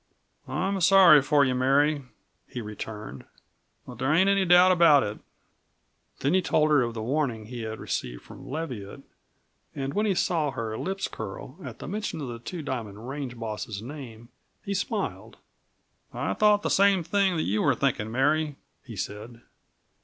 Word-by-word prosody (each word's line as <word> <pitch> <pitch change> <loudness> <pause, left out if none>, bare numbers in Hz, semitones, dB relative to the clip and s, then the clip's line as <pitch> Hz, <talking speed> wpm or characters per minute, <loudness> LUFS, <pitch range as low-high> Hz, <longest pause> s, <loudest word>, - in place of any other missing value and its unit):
"I'm 195 +1 -1
sorry 175 -4 +7
for 145 +1 +3
you, 130 - +1
Mary," 140 +4 +2 0.5
he 125 - -7
returned, 105 - -7 0.6
"but 125 - -11
there 135 +3 +1
ain't 185 +5 +4
any 195 -1 +2
doubt 180 +1 +7
about 165 -6 +6
it." 105 +1 -5 1.0
Then 140 +5 +1
he 185 - +4
told 155 -3 +2
her 145 -3 +5
of 120 -1 -2
the 110 - -4
warning 125 -4 -1
he 120 +1 -7
had 110 0 -5
received - - -4
from - - -12
Leviatt, 130 -10 -6 0.7
and 135 0 -3
when 210 +4 +1
he 195 - +1
saw 165 -5 +1
her 115 -4 -4
lips 190 - -3
curl 110 - -8
at - - -8
the - - -8
mention 210 -3 -4
of 140 -4 -5
the 120 -1 -6
Two 160 +7 -6
Diamond 115 -5 -5
range 135 -3 -5
boss's 110 -2 -5
name 120 -4 -9 0.4
he 200 - -2
smiled. 200 - -3 0.7
"I - - -2
thought 210 -1 +3
the - - 0
same 195 -2 +4
thing 190 +2 +1
that 155 - 0
you 105 +2 0
are 140 -3 +3
thinking, 115 -5 -1
Mary," 145 +4 +1 0.3
he 120 -4 -10
said. 110 +4 -6
140 Hz, 170 wpm, -26 LUFS, 115-175 Hz, 1.0 s, sorry